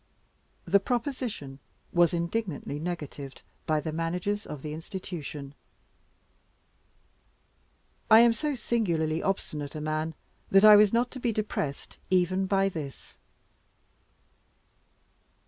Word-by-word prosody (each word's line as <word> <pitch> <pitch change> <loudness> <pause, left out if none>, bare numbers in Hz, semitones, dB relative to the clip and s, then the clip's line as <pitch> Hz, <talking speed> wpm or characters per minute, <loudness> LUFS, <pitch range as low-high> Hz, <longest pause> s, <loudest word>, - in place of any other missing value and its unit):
The 200 +3 +4
proposition 230 - -3 0.3
was 175 0 +5
indignantly 170 -4 -2
negatived 150 -5 -6 0.2
by 155 -1 +2
the 160 +1 -4
managers 180 +6 -2
of 145 -3 -7
the 150 -1 -4
Institution. 155 -5 -7 2.6
I 220 +1 +9
am 235 -1 +6
so 300 +3 -2
singularly 170 -11 0
obstinate 150 -7 -3
a - - -3
man 155 +1 -2 0.3
that 195 +2 +6
I 210 -1 +11
was 205 -1 +6
not 240 +1 +1
to 260 - -7
be 240 -1 0
depressed 205 -10 -4
even 185 +1 +2
by 195 0 +3
this. 155 -7 -7
175 Hz, 110 wpm, -28 LUFS, 155-210 Hz, 2.6 s, I